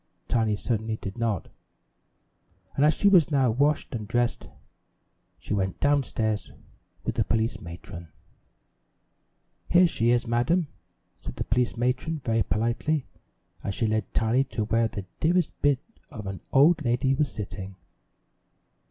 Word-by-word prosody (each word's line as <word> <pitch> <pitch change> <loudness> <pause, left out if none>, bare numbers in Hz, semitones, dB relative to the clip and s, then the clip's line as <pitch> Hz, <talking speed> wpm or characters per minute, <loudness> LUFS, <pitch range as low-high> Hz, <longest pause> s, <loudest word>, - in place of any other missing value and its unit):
Tiny 110 -3 +1
certainly 110 0 -2
did 100 +3 -7
not, 110 -6 -1 1.3
and 140 - +2
as 155 +1 +5
she 200 - +2
was 180 -7 +6
now 135 -5 +3
washed 145 +6 +1
and 110 -3 -4
dressed 120 +1 -1 0.9
she - - -5
went 95 -2 -1
down 145 0 +3
stairs 110 -4 -2 0.5
with - - -1
the - - +1
police 115 0 -1
matron. 85 0 -9 1.6
"Here 180 +1 +6
she 120 -8 +1
is, 120 -1 +3
madam," 130 +8 +1 0.5
said - - -7
the - - -2
police 125 0 0
matron 125 +6 -1
very 115 -2 +2
politely 120 - 0 0.6
as 100 - -3
she 115 - 0
led 110 -2 -1
Tiny 115 +4 +2
to 115 -5 -3
where 115 +2 +2
the 100 -3 -6
dearest 175 +1 +2
bit 145 -2 +4 0.3
of 110 -8 -8
an 95 -3 -5
old 155 +4 +5
lady 125 +2 +2
was 145 +1 0
sitting. 100 -2 -6
120 Hz, 145 wpm, -26 LUFS, 110-140 Hz, 1.6 s, was